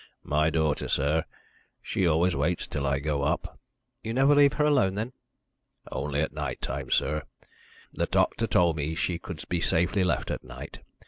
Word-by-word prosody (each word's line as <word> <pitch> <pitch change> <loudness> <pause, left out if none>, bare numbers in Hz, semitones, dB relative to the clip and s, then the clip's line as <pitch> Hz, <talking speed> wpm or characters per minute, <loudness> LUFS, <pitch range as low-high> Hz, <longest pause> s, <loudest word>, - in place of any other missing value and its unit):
"My 75 +1 +2
daughter, 80 -2 0
sir. 75 +4 +1 0.5
She 95 - 0
always 85 +2 +3
waits 80 +5 0
till 70 -1 -3
I 70 0 +2
go 70 0 -1
up." - - -2 0.4
"You 115 +1 -3
never 135 +3 +5
leave 145 -1 +6
her 150 - +1
alone, 95 -11 +3
then?" 110 +5 -3 0.8
"Only 70 0 -1
at 80 - -2
night 75 -5 -4
time, - - -4
sir. 75 +2 +1 0.7
The - - -1
doctor 115 - +1
told 85 -6 +3
me 75 +2 -2
she 85 +1 -1
could 85 -2 -7
be 90 -1 -1
safely 90 +4 +2
left 85 -8 0
at - - -4
night. 65 0 -9
80 Hz, 175 wpm, -27 LUFS, 75-95 Hz, 0.8 s, leave